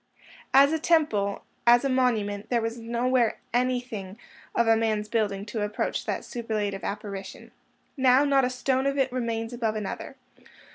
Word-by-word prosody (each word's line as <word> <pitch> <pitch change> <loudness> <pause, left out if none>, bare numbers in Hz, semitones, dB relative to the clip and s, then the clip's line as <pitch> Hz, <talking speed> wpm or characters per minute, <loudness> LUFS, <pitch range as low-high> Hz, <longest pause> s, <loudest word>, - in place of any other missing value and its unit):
As 280 +3 +6
a 320 - 0
temple, 295 -12 +1 0.2
as 240 +3 +6
a - - +3
monument, 220 -6 0
there 240 - +2
was 230 +1 -3
nowhere 235 +1 +1 0.2
anything 245 -6 -1 0.4
of 235 - +3
man's 215 -2 0
building 205 -3 -1
to 210 0 -4
approach 210 0 -2
that - - -2
superlative 215 -5 -3
apparition. 200 -1 -6 0.4
Now, 260 0 +5
not 275 -1 +3
a 250 - +2
stone 260 +1 0
of 275 0 0
it 265 -2 +1
remains 230 -2 -2
above 225 -3 -1
another. 210 -2 -5
235 Hz, 150 wpm, -26 LUFS, 210-255 Hz, 0.4 s, As